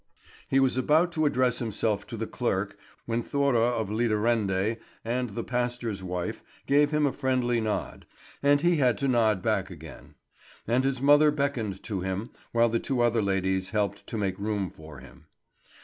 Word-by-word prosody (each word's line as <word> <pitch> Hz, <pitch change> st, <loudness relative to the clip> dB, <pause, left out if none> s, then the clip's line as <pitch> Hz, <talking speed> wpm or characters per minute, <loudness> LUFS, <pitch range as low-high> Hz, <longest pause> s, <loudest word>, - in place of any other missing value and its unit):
He 135 Hz, -, +3 dB
was 130 Hz, -1 st, +2 dB
about 155 Hz, +7 st, +3 dB
to 155 Hz, -3 st, +1 dB
address 125 Hz, -3 st, +1 dB
himself 110 Hz, -3 st, -1 dB
to -, -, -6 dB
the -, -, -2 dB
clerk, -, -, -2 dB, 0.3 s
when 115 Hz, 0 st, -1 dB
Thora 140 Hz, -2 st, +1 dB
of 110 Hz, -4 st, -1 dB
Lidarende 110 Hz, -2 st, +1 dB, 0.3 s
and 125 Hz, +1 st, -1 dB
the 115 Hz, +3 st, -4 dB
pastor's 120 Hz, -4 st, -2 dB
wife 90 Hz, -1 st, -4 dB, 0.2 s
gave 145 Hz, +1 st, +4 dB
him 150 Hz, 0 st, +2 dB
a 140 Hz, -, +1 dB
friendly 125 Hz, -3 st, 0 dB
nod, 110 Hz, -1 st, -3 dB, 0.3 s
and 145 Hz, 0 st, +4 dB
he 175 Hz, -1 st, +3 dB
had 125 Hz, -4 st, +3 dB
to 140 Hz, -, -1 dB
nod 110 Hz, -6 st, +2 dB
back 100 Hz, -4 st, 0 dB
again; 80 Hz, -3 st, -12 dB, 0.5 s
and 120 Hz, +3 st, +2 dB
his 135 Hz, -1 st, -1 dB
mother 145 Hz, +2 st, +6 dB
beckoned 135 Hz, -10 st, -2 dB
to 100 Hz, -5 st, -3 dB
him, 95 Hz, +5 st, -3 dB, 0.2 s
while 115 Hz, 0 st, +3 dB
the 115 Hz, +1 st, 0 dB
two 130 Hz, 0 st, -1 dB
other 120 Hz, -1 st, +3 dB
ladies 95 Hz, -1 st, 0 dB
helped 105 Hz, -1 st, -2 dB
to 115 Hz, -, -4 dB
make 95 Hz, -3 st, -2 dB
room 100 Hz, -3 st, -2 dB
for 80 Hz, -2 st, -12 dB
him. -, -, -16 dB
115 Hz, 175 wpm, -27 LUFS, 100-130 Hz, 0.5 s, mother